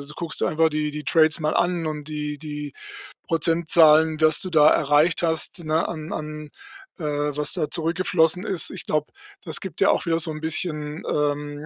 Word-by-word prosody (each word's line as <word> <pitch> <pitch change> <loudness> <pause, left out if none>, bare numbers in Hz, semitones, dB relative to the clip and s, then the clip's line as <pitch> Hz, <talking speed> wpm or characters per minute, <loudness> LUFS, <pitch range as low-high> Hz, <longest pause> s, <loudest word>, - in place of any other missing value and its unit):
guckst 170 -2 -5
du - - +2
einfach 160 +1 +2
die 150 -1 -2
die 150 0 -7
Trades 160 -1 +3
mal 155 -1 -1
an 175 -2 0
und 150 -1 -6
die 150 -1 -5
die 150 -2 -7 0.5
Prozentzahlen, 160 -1 +4
was 155 -1 +3
du 185 - -3
da 155 -2 +5
erreicht 150 +4 +2
hast, 160 +2 0
ne, 155 +1 0
an 155 -1 -7
an 150 0 -7 0.5
äh, 145 -2 -2
was 150 - +1
da 150 - -1
zurückgeflossen 170 +1 +1
ist. 190 -6 0
Ich - - -8
glaube, 150 -1 -1 0.4
das - - -2
gibt - - -8
ja - - +5
auch - - -1
wieder 165 0 +1
so 160 -1 0
'n 155 - -8
bisschen, 155 -2 -1
ähm, 145 0 -2
155 Hz, 185 wpm, -23 LUFS, 150-165 Hz, 0.5 s, da